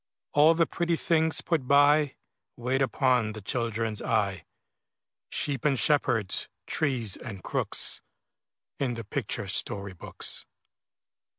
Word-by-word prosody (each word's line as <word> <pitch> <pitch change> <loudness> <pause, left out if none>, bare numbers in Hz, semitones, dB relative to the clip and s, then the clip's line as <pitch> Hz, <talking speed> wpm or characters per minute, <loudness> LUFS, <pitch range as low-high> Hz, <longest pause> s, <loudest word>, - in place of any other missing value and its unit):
All 155 +3 +6
the 165 0 +3
pretty 170 0 -1
things 160 -1 +2
put 155 -7 -1
by, 145 +1 +5 0.4
Wait 130 +2 0
upon 125 -4 +2
the 110 - -8
children's 115 0 -2
eye, 100 -3 0 0.8
Sheep 140 -5 -2
and 140 -3 +2
shepherds, 120 -9 +1 0.2
trees 125 -9 0
and 100 -7 -8
crooks, - - 0 0.8
In 125 -4 -1
the 115 - -5
picture 100 - -3
story 100 -1 -2
books. 90 - -4
130 Hz, 115 wpm, -28 LUFS, 110-145 Hz, 0.8 s, All